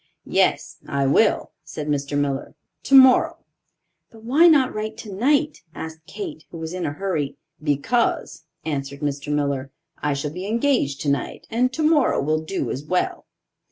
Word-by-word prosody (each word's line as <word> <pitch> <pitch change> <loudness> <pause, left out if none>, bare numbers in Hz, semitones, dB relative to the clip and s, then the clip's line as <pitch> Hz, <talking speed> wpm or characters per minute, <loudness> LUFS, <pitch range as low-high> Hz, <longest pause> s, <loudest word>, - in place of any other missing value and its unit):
"Yes, - - +1
I 140 -1 0
will," 205 +11 +3
said 150 - -6
Mr. 145 -1 -1
Miller; 140 -1 -2 0.3
"tomorrow." 265 -2 +6 0.7
"But 225 -1 -16
why 285 +9 +5
not 285 -6 +4
write 215 +1 -4
tonight?" 280 +9 0
asked 160 0 -8
Kate, 345 -7 -7
who 170 - -9
was 160 +1 -5
in 180 -1 -2
a 145 - -3
hurry. 155 -5 -2 0.2
"Because," 160 - 0 0.2
answered 140 -2 -4
Mr. 145 0 -2
Miller, 140 -2 -1 0.3
"I 145 -1 0
shall 145 +1 -3
be 180 +4 -6
engaged 230 - +1
tonight 140 -3 -2
and 250 +3 +2
tomorrow 305 0 +2
will 155 +2 0
do 160 +5 -3
as 135 - -4
well." 180 +4 -1
160 Hz, 150 wpm, -23 LUFS, -, 0.7 s, tomorrow